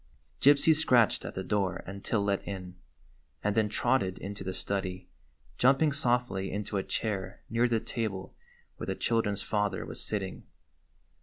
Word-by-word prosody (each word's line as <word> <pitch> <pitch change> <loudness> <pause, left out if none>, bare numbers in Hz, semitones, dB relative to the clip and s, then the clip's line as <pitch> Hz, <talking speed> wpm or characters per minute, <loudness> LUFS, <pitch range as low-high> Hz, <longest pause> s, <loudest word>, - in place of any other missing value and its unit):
Gypsy 145 +3 +6
scratched 125 -8 +3
at - - -6
the 95 - -3
door 95 -2 0
until 100 +2 -2
let 100 -1 0
in, 90 -2 -5 0.7
and 105 - +2
then 110 -1 +2
trotted 95 -4 +1
into 100 0 -6
the 95 - -3
study, 95 -2 -3 0.5
jumping 135 +4 +5
softly 125 -8 +1
into 100 +1 -2
a 95 - 0
chair 95 -4 -3
near 115 +2 +3
the 115 -2 +1
table 105 -5 -4 0.4
where - - -6
the - - -1
children's 105 -4 0
father 105 -4 -1
was - - -4
sitting. 95 -3 -3
105 Hz, 150 wpm, -30 LUFS, 95-120 Hz, 0.7 s, Gypsy